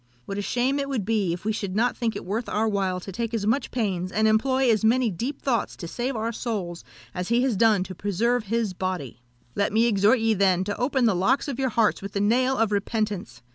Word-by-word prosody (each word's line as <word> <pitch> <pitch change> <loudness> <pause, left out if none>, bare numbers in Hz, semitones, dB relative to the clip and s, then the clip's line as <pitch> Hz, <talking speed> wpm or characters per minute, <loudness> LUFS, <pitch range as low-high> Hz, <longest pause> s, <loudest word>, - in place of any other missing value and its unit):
What 200 0 -4
a - - 0
shame 250 +6 0
it 275 0 -2
would 240 -8 -2
be 210 -5 +1
if 175 +3 -5
we 220 - +1
should 200 -3 -4
not 235 +3 +2
think 230 -2 -2
it - - -6
worth 215 +6 -3
our 220 +1 +1
while 195 -3 0
to 195 - -8
take 230 +4 -3
as 210 -3 -2
much 230 +7 +1
pains, 185 -6 -2
and 220 +2 +2
employ 260 +5 +2
as 215 -1 +1
many 235 +1 +3
deep 245 - -4
thoughts 250 -4 0
to 170 - -7
save 245 +8 -3
our 225 +1 -1
souls 205 -8 -4 0.3
as 180 0 -3
he 235 +2 +2
has 260 -5 +1
done 210 -2 +4
to 185 0 -8
preserve 215 +6 0
his 225 -1 -1
body! 180 - -4 0.3
"Let 200 - 0
me 225 +2 +3
exhort 215 +2 +4
ye, 225 0 +2
then, 190 -2 +2
to 205 +1 -3
open 260 0 +1
the 225 - +4
locks 190 +12 +1
of 275 -2 -4
your 265 -1 +1
hearts 225 -2 +1
with 200 0 -7
the 200 - -1
nail 255 +6 +2
of 225 -1 +1
repentance! 205 - -2
220 Hz, 245 wpm, -25 LUFS, 195-235 Hz, 0.3 s, done